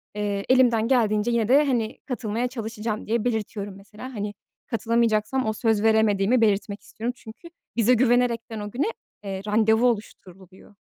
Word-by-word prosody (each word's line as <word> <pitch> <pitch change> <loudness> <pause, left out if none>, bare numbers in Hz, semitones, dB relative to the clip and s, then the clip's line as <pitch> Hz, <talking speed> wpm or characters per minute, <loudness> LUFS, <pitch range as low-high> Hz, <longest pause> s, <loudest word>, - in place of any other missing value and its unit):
eee, 205 -1 -2
elimden 240 -3 +4
geldiğince 225 -3 +2
yine 230 -2 +1
de, 280 +5 +5
hani, 240 -4 -1
katılmaya 240 -2 -2
çalışacağım 225 -3 -5
diye 230 +1 0
belirtiyorum. 210 -4 -3
Mesela, 210 +6 -11
hani, 205 -2 -4 0.3
katılamayacaksam 230 +1 0
o 220 - 0
söz 220 -1 0
veremediğimi 220 +1 +3
belirtmek 205 -1 +1
istiyorum. 235 +3 -5
Çünkü 225 +10 -12 0.3
bize 235 +1 +4
güvenerekten 235 -2 +1
o 205 0 -6
güne, 265 - -1 0.4
eee, 195 -1 -5
randevu 220 +2 +3
oluşturuluyor. 195 -4 -6
220 Hz, 145 wpm, -24 LUFS, 210-240 Hz, 0.4 s, de